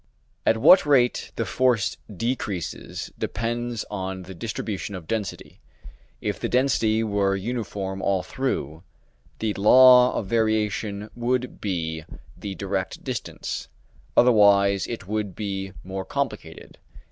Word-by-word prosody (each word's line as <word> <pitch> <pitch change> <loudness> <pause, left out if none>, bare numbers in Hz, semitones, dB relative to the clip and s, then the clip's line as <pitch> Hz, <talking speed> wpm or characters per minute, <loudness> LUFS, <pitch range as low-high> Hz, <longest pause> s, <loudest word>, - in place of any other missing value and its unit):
At 110 - +4
what 180 +11 +7
rate 130 -5 +2
the - - -1
force 125 -5 +1 0.2
decreases 105 -3 -4
depends 120 +1 -2
on 95 -2 -4
the 95 +1 -9
distribution 100 0 -4
of 90 -3 -8
density; 110 +1 -4 0.6
if - - -2
the - - -2
density 115 -4 +2
were 100 -2 +1
uniform 100 -3 -4
all 95 -2 +1
through, 85 - -3 0.6
the 110 -2 -1
law 125 +5 +7
of - - -2
variation 105 -1 0
would 125 +1 -2
be 80 -5 -2 0.3
the 100 -2 -6
direct 95 -1 -3
distance, - - -5 0.5
otherwise 100 -4 +5
it 115 -5 -6
would 105 -3 -2
be 95 -2 -4
more 95 +1 -5
complicated. 95 - -5
105 Hz, 120 wpm, -24 LUFS, 95-115 Hz, 0.6 s, what